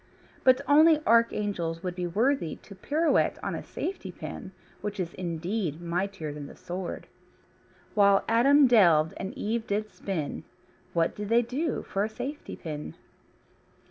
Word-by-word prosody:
But 255 +1 +5
only 310 +2 +6
archangels 205 -8 +1
would 180 -1 -2
be 180 0 -3
worthy 220 - +1
to 200 - -14
pirouette 300 - +1
on - - -2
a - - -4
safety 385 - -5
pin, 190 - -8 0.3
which 205 -1 -4
is 175 -2 -3
indeed 175 -1 -3
mightier 175 -2 -3
than 145 -1 -7
the - - -12
sword. 180 0 -6 0.9
When 200 -1 +5
Adam 275 +5 +5
delved 170 -10 +5
and 190 - -4
Eve 225 +1 -2
did 210 +1 -2
spin, 165 -7 -4 0.5
what 165 -1 +1
did 210 0 -5
they 235 +1 +4
do 280 +7 -2
for 195 - -1
a 215 - -1
safety 260 +7 -6
pin? 150 -3 -6
200 Hz, 145 wpm, -28 LUFS, 170-235 Hz, 0.9 s, only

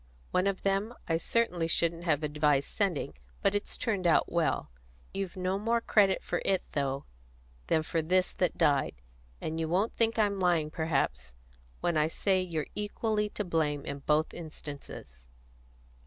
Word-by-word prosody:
One 185 +2 +2
of 195 -1 -1
them 200 +4 0
I 165 - +2
certainly 180 -5 +1
shouldn't 170 +1 +1
have 155 -2 +2
advised 150 -2 +2
sending, 195 -8 -1 0.3
but - - +3
it's 205 0 -2
turned 200 -6 0
out 165 - +3
well. 165 - 0 0.4
You've 195 -2 -3
no 185 +1 0
more 230 +3 +2
credit 200 -4 +3
for - - -2
it, 190 -1 +2
though, 140 -1 -1 0.6
than 160 - +2
for 165 +1 0
this 180 +3 +2
that 180 - 0
died; 145 -5 +2 0.5
and 160 +1 -3
you 160 -1 -1
won't 195 +6 +1
think 230 0 +2
I'm 205 -2 +2
lying, 170 -4 +2
perhaps, 105 - -1 0.5
when 170 -2 +1
I 150 0 +3
say 185 +3 +1
you're 165 -4 -2
equally 210 0 -1
to 210 - -3
blame 150 -4 0
in 140 0 -4
both 150 +2 +1
instances." 145 - -9
170 Hz, 160 wpm, -30 LUFS, 155-195 Hz, 0.6 s, but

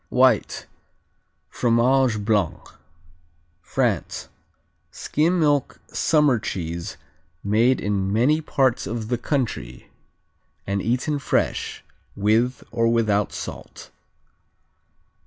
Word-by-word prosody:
White, 125 -3 +2 0.8
Fromage 120 -2 +2
Blanc 105 -6 0 0.9
France - - -1 0.6
Skim 170 +4 0
milk 145 -4 +1
summer 150 -6 +3
cheese 85 -4 -4 0.5
made 115 +6 +3
in 100 -1 -1
many 130 +9 +3
parts 130 -8 +1
of 110 +1 -4
the 120 -2 0
country 115 - -3 0.7
and 100 0 -1
eaten 130 +7 0
fresh, 135 - -1 0.3
with 115 +5 +1
or 115 0 +1
without 105 -3 +1
salt. - - -8
115 Hz, 85 wpm, -23 LUFS, 105-130 Hz, 0.9 s, summer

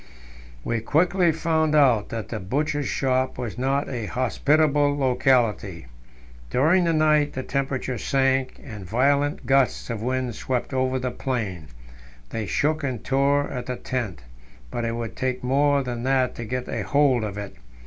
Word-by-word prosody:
We 115 -1 -1
quickly 175 - +2
found 160 -1 +1
out 125 -8 +4
that 115 -2 -5
the 110 - -4
Butcher's 145 +8 -1
Shop 130 -1 0
was 125 -1 -5
not 135 +2 0
a 120 -5 -4
hospitable 145 +3 +2
locality. 125 - +1 0.6
During 165 +8 +3
the 165 - +2
night 155 -1 +3
the 130 - -4
temperature 135 -3 -2
sank, 135 0 +1
and 110 -8 -8
violent 140 +8 +1
gusts 135 -2 +2
of 110 -2 -4
wind 130 0 -1
swept 125 +4 -3
over 130 0 +1
the 125 -1 -2
plain; 110 - -3 0.6
they 110 -3 -3
shook 155 +6 0
and 130 -5 -3
tore 140 +1 +2
at 125 -2 -5
the 125 - -2
tent, 115 - -4 0.5
but 120 - -2
it 115 0 -2
would 115 -1 -5
take 130 -1 -2
more 140 +2 +2
than 120 -2 -4
that 130 0 +1
to 120 - -6
get 125 +2 -3
a - - -3
hold 140 -5 +2
of 105 -2 -4
it. 100 -1 -6
130 Hz, 160 wpm, -24 LUFS, 120-145 Hz, 0.6 s, out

